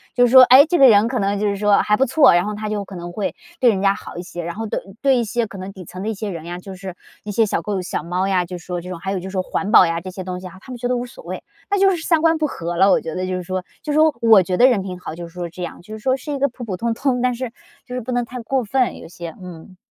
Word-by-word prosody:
就 245 - +5
是 - - -2
说， 260 -1 +10
诶， 260 +4 +8
这 350 - +1
个 270 - +8
人 215 0 +5
可 250 0 -2
能 200 0 0
就 210 - 0
是 200 - 0
说 205 0 +3
还 210 0 +2
不 270 - +3
错， 275 - +5
然 175 - +2
后 210 - -3
他 210 0 -5
就 205 -2 -3
可 190 - -10
能 175 0 -7
会 200 +2 -3 0.2
对 245 -3 +5
人 195 -2 -2
家 200 0 +3
好 - - -10
一 - - -4
些， 175 -1 -7
然 170 +2 -5
后 225 0 -4
对 - - -2 0.2
对 270 -2 +4
一 235 - +1
些 230 +1 -1
可 195 -1 -10
能 190 +1 -7
底 185 - -10
层 185 +4 -8
的 220 - -2
一 - - -1
些 210 +1 -5
人 165 -3 -6
呀， 175 +1 -6
就 190 +1 -9
是 185 -1 -8 0.3
一 210 - -5
些 220 +2 +3
小 195 - -1
狗 200 -3 -2
小 180 - -4
猫 180 +3 -1
呀， 185 -2 +1
就 180 0 -7
是 - - -17
说 175 -1 -4
这 180 - -9
种 175 -2 -6
还 195 +2 -4
有 190 - -2
就 190 +2 -7
说 190 -2 -1
环 195 +2 -3
保 185 - +8
呀 165 0 -1
这 185 +1 -7
些 185 0 -7
东 180 0 -5
西 185 - -8
啊， 185 +1 -13
他 260 - -12
们 245 - -6
觉 245 +1 -2
得 250 - 0
无 245 - -3
所 - - -14
谓， - - -6 0.3
那 405 - +2
就 390 0 +5
是 325 - -7
三 330 -3 +3
观 325 -1 +3
不 310 - 0
和 170 - -5
了， 195 +3 +5
我 - - +3
觉 160 -1 -6
得 185 - -2
就 185 - -2
是 180 - -3
说。 185 +1 -3 0.2
就 300 - -4
是 - - +1
说 310 -1 +5
我 220 -5 +6
觉 180 0 -2
得 250 - +7
人 230 -7 +2
品 180 -2 -6
好， 160 - -7
就 170 0 -7
是 165 - -17
说 175 -1 -5
这 180 +1 -8
样， 175 - -7
就 215 +4 -9
是 - - -12
说 260 +4 +1
是 295 +3 -7
一 - - -2
个 280 0 +2
普 245 0 -10
普 185 -4 -4
通 230 +2 -1
通， 255 0 0
但 250 -1 +1
是 245 -1 -5 0.3
就 250 - -7
是 250 - -3
不 250 +3 -6
能 245 -1 0
太 250 +1 -8
过 260 +2 -1
分， 255 +3 0
有 - - -11
些， 170 -1 -8
嗯。 180 +1 -11
200 Hz, 380 characters per minute, -20 LUFS, 180-245 Hz, 0.3 s, 说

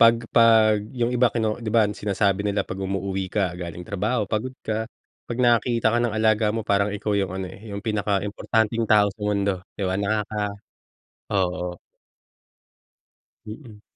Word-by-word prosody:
pag 115 0 +7 0.2
pag 110 -2 +5 0.2
yung 120 0 0
iba 125 0 +4
kino 110 -1 -1
di 115 - -4
ba 110 0 +4
sinasabi 100 -1 0
nila 100 0 0
pag 95 - -6
umuuwi 95 0 -2
ka 95 -2 0
galing 85 0 -6
trabaho 105 +4 -1
pagod 115 +6 -3
ka. 110 +1 -2 0.4
Pag 120 - -3
nakakita 120 -2 +3
ka 120 - +2
ng 120 -3 0
alaga 110 0 +3
mo 110 0 -3
parang 100 -1 +2
ikaw 105 +1 -2
yung 100 -1 +1
ano 95 -1 -3
eh, 110 0 -12
yung 100 - -4
pinaka-importanteng 105 +2 0
tao 105 -1 +6
sa 105 - -28
mundo, 100 -1 +1 0.2
di - - -4
ba? 95 - 0
Nakaka 105 +1 -1 0.9
oo. 90 -2 0 1.8
Mm. 110 -1 -10
105 Hz, 160 wpm, -24 LUFS, 100-115 Hz, 1.8 s, pag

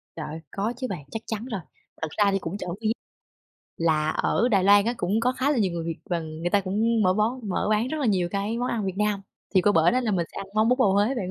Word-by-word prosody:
Trời 160 - -5
ơi, 160 +2 -6
có 210 +4 -2
chứ 255 0 -3
bạn, 175 -7 -5
chắc 225 - -4
chắn 220 +1 -4
rồi. 220 -7 -4 0.4
Thật 160 - -1
ra 205 -2 +4
thì 195 - +1
cũng 180 +2 -5
trộm 180 -4 -4
vía 220 - +1 0.9
là 155 -2 +1
ở 235 +8 +1
Đài 195 -4 +3
Loan 200 +1 +6
á, 235 +2 0
cũng 205 +1 0
có 250 +2 +2
khá 265 +2 0
là 290 - +1
nhiều 195 -5 +1
người 170 -1 -3
Việt 165 -1 -3
và 170 -1 +1
người 160 +2 -4
ta 200 - +4
cũng 215 +4 +1
mở 185 -1 +4
bón 220 +2 -1
mở 185 - -1
bán 215 +3 +2
rất 315 - -3
là 270 - +1
nhiều 185 -4 +2
cái 205 +3 -2
món 245 +1 -1
ăn 220 -3 -1
Việt 190 -1 -3
Nam. 210 -1 +1 0.3
Thì 190 - +6
qua 205 - +4
bển 165 +5 +4
á 255 - +3
là 235 -4 -1
mình 175 -4 0
sẽ - - -15
ăn 195 - -5
món 215 +1 +3
bún 250 - +4
bò 255 - +5
Huế 205 +6 +2
bạn 190 -7 -3
205 Hz, 290 wpm, -25 LUFS, 180-230 Hz, 0.9 s, Loan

